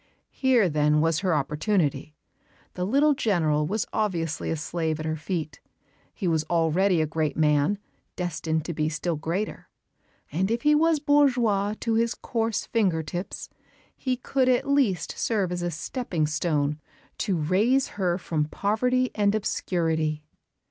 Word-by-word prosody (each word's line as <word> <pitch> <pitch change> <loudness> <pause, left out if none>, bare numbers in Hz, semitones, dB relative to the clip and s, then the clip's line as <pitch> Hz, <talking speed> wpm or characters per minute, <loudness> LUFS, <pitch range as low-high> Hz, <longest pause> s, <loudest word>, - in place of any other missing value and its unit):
Here 255 -7 +3
then 150 -1 +2
was 165 0 +2
her 185 -4 +1
opportunity. 150 0 0 0.6
The 180 - -2
little 285 +6 +4
General 160 - +1
was 210 +5 -1
obviously 170 -8 -1
a - - 0
slave 160 0 -2
at 155 - -4
her 155 0 -1
feet; 155 -2 -4 0.5
he 185 - -4
was 160 -2 +2
already 170 +2 +2
a - - +1
great 155 -1 -2
man, 150 +4 +3 0.4
destined 160 -3 -2
to 170 - -3
be 155 0 0
still 165 +2 -2
greater; 170 +7 -4 0.6
and 185 +6 0
if 235 +1 -1
he 300 - +5
was 320 +1 +4
bourgeois 245 -9 +2
to 230 - 0
his 230 +1 +1
coarse 225 -2 -2
finger 185 -8 +1
tips, 175 +5 -5 0.5
he 255 -2 -2
could 260 +1 +1
at 250 +1 +2
least 260 - +1
serve 200 -6 0
as 175 0 -2
a 175 - -1
stepping 170 - -2
stone 150 -1 0 0.4
to 190 -4 0
raise 210 - +2
her 180 -3 -1
from 160 -4 -1
poverty 250 +9 0
and 205 0 +2
obscurity. 160 -7 -1
175 Hz, 150 wpm, -26 LUFS, 155-225 Hz, 0.6 s, he